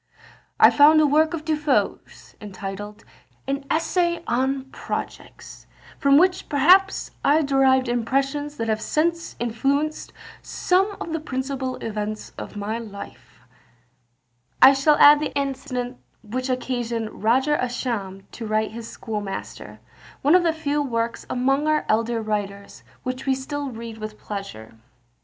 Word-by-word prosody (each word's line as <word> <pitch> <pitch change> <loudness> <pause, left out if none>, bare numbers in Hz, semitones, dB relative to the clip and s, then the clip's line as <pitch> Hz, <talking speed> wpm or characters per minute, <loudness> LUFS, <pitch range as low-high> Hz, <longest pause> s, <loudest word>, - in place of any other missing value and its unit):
"I - - +8
found 300 +2 +6
a 310 - +5
work 310 +3 +3
of 305 -2 -8
De 315 -1 +1
Foe's, 300 -2 -2
entitled 205 +1 -7 0.4
an 275 +1 -2
'Essay 340 +1 0
on 265 +2 0
Projects,' - - -7 0.3
from 280 0 +5
which 365 +3 +2
perhaps 365 +8 +4
I 305 +3 +4
derived 265 -2 +3
impressions 275 +5 -1
that 225 - -2
have 220 -1 0
since 335 +5 -1
influenced 275 +6 -1 0.3
some 390 +3 0
of 330 - -5
the 325 - -1
principal 260 -2 -3
events 215 -1 -4
of - - -8
my 210 +3 -3
life." 205 -3 -11 1.2
I 270 - +9
shall 275 +3 +3
add 295 0 +8
the 300 - -4
incident 260 -3 -3 0.2
which 255 +4 -4
occasioned 240 -3 -3
Roger 260 +7 +3
Ascham 225 -7 -3
to 225 - -7
write 215 0 0
his 230 0 -8
Schoolmaster, 210 -4 -6 0.4
one 290 +4 +4
of 365 - +6
the 335 -1 +2
few 295 -2 -1
works 230 -4 -2
among 270 +4 +1
our 310 0 +1
elder 230 +1 0
writers, 200 -2 -4 0.2
which 255 +2 -5
we 265 - +3
still 285 +1 -4
read 230 -2 -8
with 215 0 -7
pleasure. 195 - -8
260 Hz, 140 wpm, -23 LUFS, 225-295 Hz, 1.2 s, I